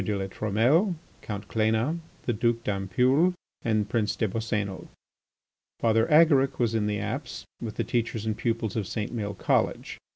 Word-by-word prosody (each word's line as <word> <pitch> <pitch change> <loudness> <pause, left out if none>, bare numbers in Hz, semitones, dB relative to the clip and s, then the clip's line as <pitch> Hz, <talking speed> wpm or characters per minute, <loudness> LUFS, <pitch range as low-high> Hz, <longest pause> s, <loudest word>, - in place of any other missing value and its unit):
de 105 +1 -1
La 95 - -2
Trumelle, 120 - +2 0.3
Count 100 -2 -6
Cléna, 110 +9 +1 0.2
the 120 - 0
Duke 115 +1 0
d'Ampoule, 125 - +2 0.3
and 110 -2 +1
Prince 110 -1 0
des 110 - 0
Boscénos. 105 -2 -3 0.9
Father 115 0 +3
Agaric 150 -4 +5
was 115 -2 +1
in 110 -2 +1
the 105 0 0
apse 120 +7 -4 0.2
with 110 -3 -5
the - - 0
teachers 115 -2 -1
and 110 -1 0
pupils 115 -3 -1
of 105 -4 -1
St. 110 +1 -3
Maël 105 -3 -3
College. - - 0
110 Hz, 160 wpm, -27 LUFS, 105-120 Hz, 0.9 s, Agaric